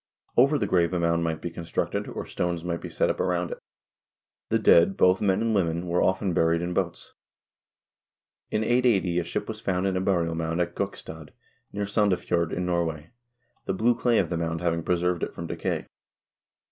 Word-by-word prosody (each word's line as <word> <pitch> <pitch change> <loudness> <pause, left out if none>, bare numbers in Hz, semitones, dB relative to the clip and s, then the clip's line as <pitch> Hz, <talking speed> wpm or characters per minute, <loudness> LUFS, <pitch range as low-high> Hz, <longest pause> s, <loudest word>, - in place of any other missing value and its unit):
Over 140 +4 +5
the - - 0
grave 85 -1 +2
a 90 - 0
mound 85 0 +1
might 80 -1 -2
be 85 - -3
constructed, 85 0 -3
or - - -5
stones 85 -2 -2
might 85 -1 -3
be - - -6
set - - +1
up - - -6
around 90 -1 0
it. - - -6 0.9
The - - +3
dead, 85 +3 +5
both 90 +1 +4
men 95 +1 +2
and 115 -1 +1
women, 85 -3 0
were 85 +1 +1
often 95 0 +1
buried 85 +1 +2
in 90 +1 -2
boats. 90 -2 -3 1.4
In 105 - 0
1880 110 -7 +2
a - - -1
ship 85 - -4
was 110 -1 -6
found 90 0 0
in 95 -1 0
a 90 - 0
burial 85 -4 +1
mound 80 +1 -2
at 85 -1 -1
Gokstad, 80 -6 -5 0.4
near 100 0 -2
Sandefjord, 90 -5 +1
in 90 - -2
Norway, 85 -2 -2 0.5
the 95 - -1
blue 115 +5 +3
clay 120 0 +1
of - - +1
the 85 - 0
mound 80 -1 -2
having 85 -1 0
preserved 90 0 0
it - - -4
from 85 - -5
decay. - - -3
90 Hz, 195 wpm, -26 LUFS, 85-95 Hz, 1.4 s, Over